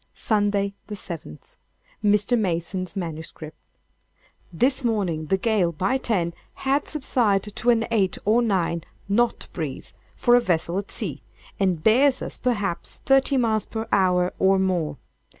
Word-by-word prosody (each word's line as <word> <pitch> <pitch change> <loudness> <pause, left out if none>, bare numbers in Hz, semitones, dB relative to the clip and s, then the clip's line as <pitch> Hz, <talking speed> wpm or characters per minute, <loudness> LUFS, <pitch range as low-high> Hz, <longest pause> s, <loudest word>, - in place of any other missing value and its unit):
"Sunday, 205 -2 +1
the 210 - -5
seventh. 165 - -9 0.5
[Mr. 210 +3 +3
Mason's 185 -3 -2
MS.] 160 -4 -5 1.2
This 260 - +1
morning 185 -9 -1
the 190 - +2
gale, 195 -4 +1
by 190 +11 0
10, 180 -9 0 0.2
had 275 +2 0
subsided 215 -8 0
to 240 - +1
an 230 -1 +3
eight 195 -5 +1
or 220 +4 +4
nine—knot 200 +2 -1
breeze, - - -5 0.2
(for 240 -1 +4
a 245 - +5
vessel 175 -3 0
at 200 - -7
sea,) 155 - -4 0.4
and 185 -5 +1
bears 255 +5 +4
us, - - -5
perhaps, 205 -8 -1
thirty 270 0 +4
miles 220 -4 +1
per 220 0 -4
hour, 180 -1 +2
or 190 0 +4
more. 175 -6 0
200 Hz, 135 wpm, -24 LUFS, 180-230 Hz, 1.2 s, a